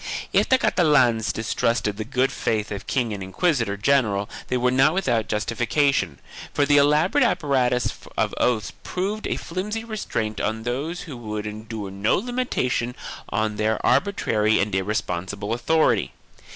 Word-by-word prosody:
2 - - +6
If - - 0
the 260 - +6
Catalans 130 - +3
distrusted 110 -1 0
the 110 - -4
good 130 +3 0
faith 105 -4 -1
of 100 -1 -6
king 120 -5 0
and 100 - -6
inquisitor 115 - 0
general 105 -4 +2 0.2
they 125 - 0
were 125 0 +2
not 135 +6 +4
without 115 - +1
justification, 115 - 0 0.4
for 145 - +3
the 145 0 +4
elaborate 150 - +4
apparatus 130 - +1 0.2
of - - +1
oaths 110 -4 0
proved 200 +4 -3
a - - -1
flimsy 210 +6 -4
restraint 115 - -3
on 110 +1 -2
those 140 +9 -3
who 150 -6 -8
would 105 -2 -5
endure 110 -1 -6
no 100 +3 +1
limitation 195 - -1 0.3
on 105 +1 -1
their 110 0 +1
arbitrary 115 - +2
and 100 0 0
irresponsible 95 +1 -2
author 155 +7 +3
ity. - - -3
120 Hz, 150 wpm, -23 LUFS, 105-150 Hz, 0.4 s, 2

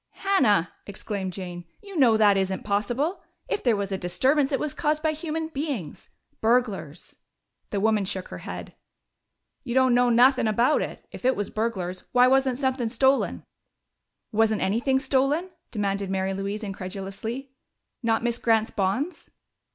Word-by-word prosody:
"Hannah!" 210 - +3 0.2
exclaimed 200 -1 -4
Jane. 175 -1 -7 0.2
"You 400 -2 -11
know 245 -8 +5
that 210 -2 +5
isn't 190 -1 -1
possible. 240 - -1 0.3
If - - -1
there 240 -3 +3
was 200 -1 -3
a 190 - -2
disturbance, 265 +11 +1
it 270 - +1
was 300 -2 -2
caused 305 0 0
by 315 - +3
human 315 +1 -4
beings. 275 - -5 0.3
Burglars." 220 - 0 0.5
The 200 - -1
woman 215 -1 +2
shook 185 -1 -4
her - - -7
head. - - -7 0.9
"You 240 - -4
don't 260 -1 +4
know 245 0 +4
nuthin' 245 +1 +5
about 235 +7 +3
it! - - -6
If - - -10
it 260 +1 +3
was 205 - -3
burglars, 190 -5 -3
why 250 0 +6
wasn't 265 -1 +3
somethin' 260 -3 0
stolen?" 265 +3 +2 0.9
"Wasn't 220 -1 +2
anything 240 +7 +1
stolen?" 280 +7 +1 0.2
demanded 200 -2 -2
Mary 190 0 -1
Louise 200 +3 -4
incredulously. 195 +6 -6 0.5
"Not 225 -2 +1
Miss 240 0 0
Grant's 225 -1 +2
bonds?" 235 - -2
230 Hz, 150 wpm, -25 LUFS, 195-265 Hz, 0.9 s, why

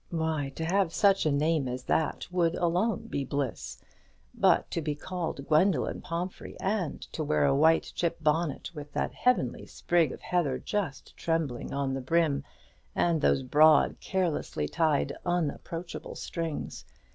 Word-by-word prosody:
Why, 160 -4 -1
to 160 - -3
have 185 0 +1
such 195 -5 +4
a - - +2
name 150 0 +1
as 125 0 -4
that 160 +3 0
would 175 -2 +2
alone 180 +7 0
be 140 -11 -2
bliss; 135 -2 -3 0.6
but - - +3
to 165 - -1
be 150 -1 -2
called 165 -3 -5
Gwendoline 155 -2 +2
Pomphrey, 175 +2 -5
and 190 -6 -1
to 160 - -2
wear 150 0 +2
a 135 -1 +3
white 160 +3 +4
chip 170 -1 -1
bonnet 155 0 0
with 150 -2 -9
that - - -1
heavenly 245 - +1
sprig 170 -5 +1
of - - -9
heather 160 -8 0
just 190 -10 -4
trembling 160 -7 -2
on 140 -1 -1
the 135 - -3
brim, 155 +1 +1 0.5
and 165 -3 +2
those 135 - +3
broad, 155 +4 +5
carelessly 170 - -1
tied, 150 - +1
unapproachable 170 0 -3
strings! 165 -3 -4
160 Hz, 150 wpm, -29 LUFS, 145-175 Hz, 0.6 s, broad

